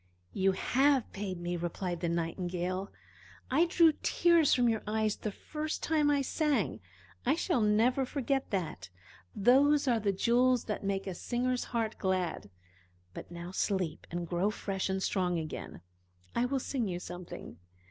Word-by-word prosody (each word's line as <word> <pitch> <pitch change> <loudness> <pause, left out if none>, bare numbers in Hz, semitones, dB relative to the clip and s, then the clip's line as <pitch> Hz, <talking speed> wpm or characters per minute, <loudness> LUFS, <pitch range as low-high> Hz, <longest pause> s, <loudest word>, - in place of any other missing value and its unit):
"You 195 0 +2
have 265 +5 +2
paid 190 -3 -4
me!" 175 0 -2
replied 175 +1 -3
the 170 - -1
Nightingale. 180 +3 -2 0.6
"I 310 +6 +4
drew 335 -2 +5
tears 340 -3 +4
from 245 -1 +4
your 225 -2 +1
eyes, 215 -1 +1
the 215 - -4
first 305 +8 -5
time 305 -2 +2
I 285 -1 +2
sang 300 +1 0 0.4
I 270 +5 +3
shall 330 -6 +1
never 225 +5 +3
forget 270 0 -1
that. 155 - -3 0.5
Those 275 +7 +4
are 235 -3 +3
the 205 -2 +1
jewels 245 +5 +3
that 210 -2 -4
make 195 0 -1
a 190 - -3
singer's 250 +6 -1
heart 225 -2 -2
glad. 185 - -1 0.6
But - - -8
now 175 +1 -7
sleep 190 -4 -1
and 175 0 -4
grow 180 +4 +1
fresh 195 -2 -3
and 190 0 -1
strong 180 -3 0
again. 155 - -6 0.5
I 240 - +1
will 270 +2 0
sing 250 -3 -2
you 175 -2 -3
something." 175 - -8
210 Hz, 160 wpm, -31 LUFS, 180-255 Hz, 0.6 s, drew